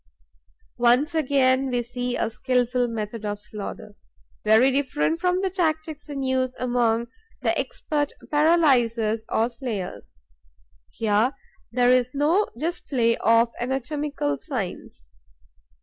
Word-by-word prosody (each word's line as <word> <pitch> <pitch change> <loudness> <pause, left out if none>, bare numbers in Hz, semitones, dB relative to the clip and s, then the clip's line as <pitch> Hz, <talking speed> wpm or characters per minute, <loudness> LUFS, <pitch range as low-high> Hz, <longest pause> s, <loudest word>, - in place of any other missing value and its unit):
Once 250 +7 +3
again, 270 -3 +2
we 245 -1 0
see 245 +1 -3
a - - 0
skilful 250 +1 0
method 220 -1 -5
of 205 -1 -3
slaughter, 210 0 -8 0.5
very 220 +5 +5
different 285 +4 0
from 360 +1 +1
the 385 - 0
tactics 315 -4 -2
in 275 -2 -4
use 260 -1 0
among 235 -2 +1 0.4
the - - +2
expert 295 -2 -2 0.2
paralyzers 245 -9 +3
or 225 - +2
slayers. 215 - -6 0.6
Here 220 +4 +1 0.4
there 245 +1 +3
is 255 +1 +2
no 325 +9 +2
display 260 -6 0
of 230 +1 +3
anatomical 265 - -2
science. - - -6
250 Hz, 115 wpm, -24 LUFS, 230-290 Hz, 0.6 s, very